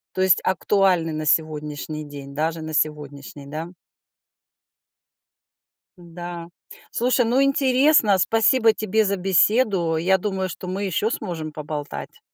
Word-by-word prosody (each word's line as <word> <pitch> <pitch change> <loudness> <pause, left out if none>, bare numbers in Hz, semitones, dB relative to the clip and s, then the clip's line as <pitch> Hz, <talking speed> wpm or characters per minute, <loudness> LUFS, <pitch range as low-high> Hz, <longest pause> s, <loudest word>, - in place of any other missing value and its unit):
То 185 - -1
есть 190 -1 +4
актуальны 185 -3 +1
на 155 0 -4
сегодняшний 150 0 -1
день, 140 -1 -10
даже 160 +2 -2
на 155 0 -6
сегодняшний, 145 -2 -3
да? 160 +5 -6 2.2
Да. 175 0 -8 0.4
Слушай, 245 +1 +1
ну 245 +4 +2
интересно, 270 -5 +3
спасибо 225 +3 +3
тебе 215 +1 0
за 200 - 0
беседу. 190 -2 +2
Я 190 +4 +2
думаю, 190 -1 -3
что 180 - -8
мы 195 +2 -3
ещё 205 +5 -1
сможем 165 -7 -5
поболтать. 150 -1 -7
175 Hz, 120 wpm, -22 LUFS, 155-210 Hz, 2.2 s, есть